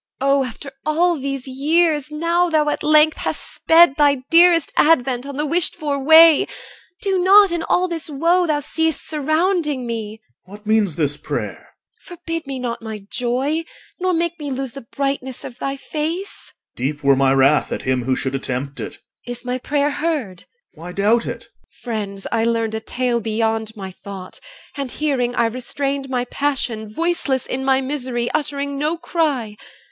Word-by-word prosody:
EL. 270 +1 +1
Oh! 275 -1 +3
after 255 +3 -8
all 330 +2 +2
these 275 -1 -4
years, 300 +2 +1
II 300 - -6
Now 340 +2 +2
thou 310 -2 +2
at - - -2
length 305 +1 +4
hast - - -3
sped 325 -3 +5
Thy 285 -3 +3
dearest 335 -1 +5
advent 265 -4 +3
on 280 -1 -6
the 300 - 0
wished 330 +3 +2
for 285 -2 -2
way, 320 +1 +7 0.6
Do 385 -2 +1
not, 395 0 +7
in 340 -1 -1
all 360 +2 +1
this 330 -2 -5
woe 340 +5 +2
Thou 295 -2 +1
seest 320 +1 -2
surrounding 310 -2 0
me 220 -2 -5 0.3
OR. 195 - -10
What 210 +1 -16
means 210 -6 +2
this 145 -2 0
prayer? - - -4
EL. - - -22 0.4
Forbid 330 -3 -6
me 270 -1 -4
not 245 -2 -4
my 215 -3 -7
joy, 260 +6 -1 0.4
Nor 370 0 +1
make 340 0 -1
me 295 -1 -4
lose 265 -1 -3
the 275 +2 -9
brightness 265 +1 -4
of 245 0 -9
thy 275 0 -2
face! 320 +7 -5
OR. - - -54
Deep 145 +4 -3
were 140 0 +5
my 135 0 +3
wrath 135 +2 +3
at - - -3
him 130 -2 0
who 130 0 +1
should 130 0 -2
attempt 135 +1 -3
it. - - -6 0.3
EL. 245 - -3
Is 245 +1 -13
my 250 +1 -2
prayer 290 +2 0
heard? 285 - -3 0.3
OR. 155 - -15
Why 180 - -6
doubt 215 +5 +2
it? - - -5
EL. - - -22 0.3
Friends, 205 -5 -4
I 225 -1 +1
learned 230 -1 0
A 220 - -2
tale 245 +1 -1
beyond 220 0 -1
my 190 -1 -6
thought; 190 0 -9 0.4
and 280 -3 -4
hearing 255 -5 -1
I 235 - +3
restrained 270 +3 -3
My 250 -1 -1
passion, 245 -6 -2
voiceless 305 -2 -1
in 265 +1 -3
my 265 0 +3
misery, 255 -3 -3
Uttering 280 -2 -2
no 305 +3 0
cry. 290 -11 -1
275 Hz, 185 wpm, -20 LUFS, 225-315 Hz, 0.6 s, way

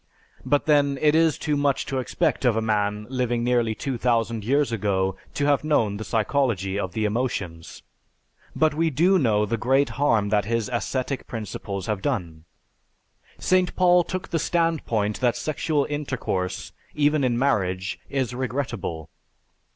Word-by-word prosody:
But 145 -1 +1
then 145 -2 +3
it 150 +1 +4
is 160 -1 +3
too 150 -2 -1
much 140 -1 +1
to 135 - -2
expect 155 +5 -1
of 120 -4 +3
a - - +3
man 105 -1 0
living 120 -2 0
nearly 120 -2 +1
two 135 -2 -4
thousand 115 -2 0
years 140 +4 +1
ago 95 -3 0 0.2
to 145 - 0
have 145 0 +2
known 115 -10 +1
the 110 - -5
psychology 110 -5 0
of 95 -3 -3
the 110 -1 -1
emotions, 100 -8 -3 0.7
but 155 -1 +3
we 165 +2 +1
do 175 +7 +3
know 105 -6 +2
the 115 +2 -1
great 135 +3 +3
harm 110 -8 +3
that 105 -2 +2
his 115 +1 -1
ascetic 130 +2 -2
principles 100 -4 -5
have 105 -3 -2
done. 85 - -3 0.9
St. 185 0 +1
Paul 180 -1 +5
took 185 +1 -5
the 165 - 0
standpoint 150 -12 0
that 125 -2 +1
sexual 155 -1 -1
intercourse, 135 -11 -3 0.2
even 150 0 +2
in 120 -2 +1
marriage, 95 -8 0
is 130 -3 -1
regrettable. 120 - -3
125 Hz, 155 wpm, -24 LUFS, 105-145 Hz, 0.9 s, Paul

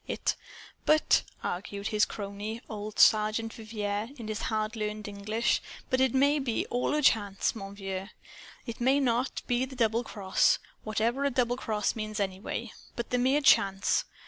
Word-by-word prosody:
It - - -1 0.2
" - - -19
"But," 310 0 +5 0.2
argued 200 +3 -3
his 210 -1 +3
crony, 205 +2 -5
old 210 -1 -6
Sergeant 215 +1 +4
Vivier, 215 -1 -3
in 225 -2 -7
his 215 0 -3
hard 215 0 -1
learned 210 -1 -3
English, 210 +3 0 0.3
"but 255 0 +3
it 265 -1 +3
may 285 +3 +4 0.3
all 245 +1 0
be - - +1
of - - +2
a - - +1
chance, 205 -6 +2
mon 195 -2 -7
vieux. 195 -1 -5 0.6
It 235 0 -6
may, 265 +3 +4
not 250 -1 0
be 245 +1 +1
the 260 0 -10
doubled 230 -1 +1
cross, 190 -2 +2 0.3
whatever 225 +5 0
a 280 - +3
doubled 245 -1 0
cross 215 -4 -1
means, 215 -1 -4 0.8
but 235 - -5
the 250 - +2
mere 265 +4 +3
chance. 195 - +4
220 Hz, 170 wpm, -29 LUFS, 205-245 Hz, 0.8 s, But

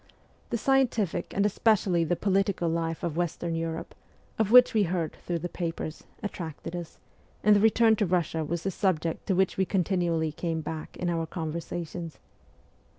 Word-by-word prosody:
The 235 - 0
scientific 230 -9 +1
and 200 - +2
especially 200 -4 +2
the 165 +2 +1
political 195 -1 +1
life 165 0 -2
of 165 -3 -2
Western 175 -1 -1
Europe, 165 0 -3 0.5
of 220 -3 +2
which 250 +1 +8
we 220 - +3
heard 170 -2 -2
through 175 - -2
the 170 +2 -3
papers, 165 -3 -5 0.2
attracted 170 -4 -5
us, 175 -2 -7 0.5
and 210 0 +6
the - - +5
return 220 +1 +5
to 205 - +1
Russia 170 -2 0
was 165 +2 -3
the 195 - -1
subject 170 -4 -1
to 190 - +2
which 190 0 +1
we 190 - +3
continually 175 -4 0
came 165 +1 -3
back 155 0 -6
in 180 - -2
our 165 -1 -1
conversa 165 +1 -4
tions. 165 -1 -7
175 Hz, 170 wpm, -28 LUFS, 165-195 Hz, 0.5 s, which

